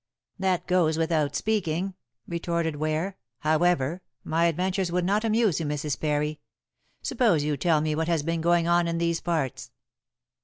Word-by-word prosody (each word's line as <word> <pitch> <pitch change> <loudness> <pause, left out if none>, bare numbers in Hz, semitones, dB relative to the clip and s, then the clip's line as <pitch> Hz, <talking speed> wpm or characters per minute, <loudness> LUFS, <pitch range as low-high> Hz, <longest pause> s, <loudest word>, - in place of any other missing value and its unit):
"That 190 -2 0
goes 170 -4 +2
without 160 -3 +1
the - - 0
speaking," 190 -3 -1 0.3
retorted 170 -2 -2
Ware. 155 +5 -1 0.2
"However, 160 0 +2 0.2
my 165 +2 +1
adventures 180 +2 0
would 180 0 0
not 205 +4 +1
amuse 220 -6 +2
you, 165 - -2
Mrs. 150 -1 -2
Parry. 150 0 -1 0.6
Suppose 230 - +2
you 150 0 0
tell 160 0 +2
me 155 0 0
what 160 +1 -1
has 165 -3 +1
been 165 +1 -1
going 170 0 +3
on 175 0 +3
in 165 0 -1
these 170 0 0
parts?" 155 -7 -2
170 Hz, 160 wpm, -26 LUFS, 155-180 Hz, 0.6 s, going